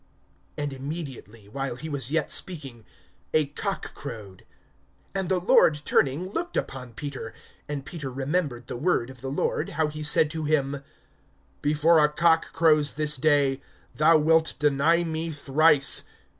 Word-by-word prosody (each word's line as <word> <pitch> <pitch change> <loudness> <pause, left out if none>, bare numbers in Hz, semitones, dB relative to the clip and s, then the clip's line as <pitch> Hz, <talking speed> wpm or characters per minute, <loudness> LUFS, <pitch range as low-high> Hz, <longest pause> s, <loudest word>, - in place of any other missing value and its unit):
And 145 -2 -3
immediately, 135 -7 -8
while 135 +3 -4
he 155 +6 -8
was 140 -5 -3
yet 165 +3 0
speaking, 135 - -1 0.5
a 155 -1 +4
cock 195 +8 -5
crowed. 105 -9 -10 0.7
(61)And 190 -2 -2
the 185 -1 +2
Lord 160 -4 +4
turning 145 +8 +1
looked 345 - -4
upon 125 -3 -5
Peter. 130 -1 -7 0.3
And 140 -2 -4
Peter 140 -3 -6
remembered 135 -1 -2
the - - -6
word 130 -4 0
of 130 -2 -16
the 135 - -5
Lord, 140 - -1
how 160 -1 +1
he 155 0 -7
said 150 0 +6
to 160 -1 -4
him: 140 -2 0 0.8
Before 155 +2 +3
a 150 - +4
cock 165 +2 +2
crows 155 -3 +3
this 150 0 0
day, 140 -1 +2 0.3
thou 155 +2 +4
wilt 160 +1 +2
deny 150 +4 +2
me 165 0 -3
thrice. 145 0 +3
150 Hz, 150 wpm, -25 LUFS, 135-160 Hz, 0.8 s, said